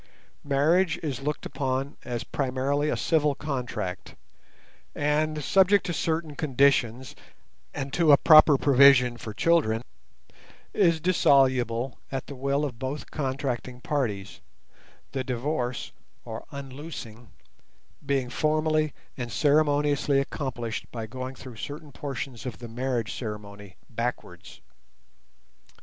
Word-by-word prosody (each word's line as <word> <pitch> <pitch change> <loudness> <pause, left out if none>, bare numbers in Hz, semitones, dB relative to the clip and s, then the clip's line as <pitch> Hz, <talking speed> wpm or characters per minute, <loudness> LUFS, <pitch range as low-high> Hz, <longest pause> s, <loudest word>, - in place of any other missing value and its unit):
Marriage 160 +6 +2
is 140 -5 -3
looked 150 +2 -3
upon 135 0 -2
as 120 -2 -4
primarily 140 +2 -1
a - - 0
civil 150 -3 +2
contract, 125 -11 -4 0.8
and, 150 +1 0
subject 195 +5 +4
to 175 - -2
certain 160 -2 -2
conditions 130 -4 +1 0.6
and 135 -1 -5
to 165 -3 +4
a 140 - +9
proper 155 -2 +7
provision 135 -3 +6
for 110 -2 -7
children, 120 -4 +2 0.9
is 170 -5 +3
dissoluble 130 -7 +2
at 135 -1 -3
the - - -8
will 140 +3 0
of 125 -5 -6
both 135 +3 -5
contracting 130 -3 -3
parties, 115 -9 -3 0.7
the 130 - -2
divorce, 125 0 -2 0.3
or 110 -1 -7
"unloosing", 135 -5 -8 0.7
being 135 -2 0
formally 155 0 +1 0.2
and 120 -2 -5
ceremoniously 145 +3 +2
accomplished 130 -5 -4
by 115 -2 -5
going 130 +3 -6
through 125 -3 -11
certain 145 +5 -7
portions 135 -3 -6
of 120 - -6
the 120 - -8
marriage 120 -1 -2
ceremony 105 -4 -7
backwards. 115 -7 -5
135 Hz, 115 wpm, -26 LUFS, 120-150 Hz, 0.9 s, a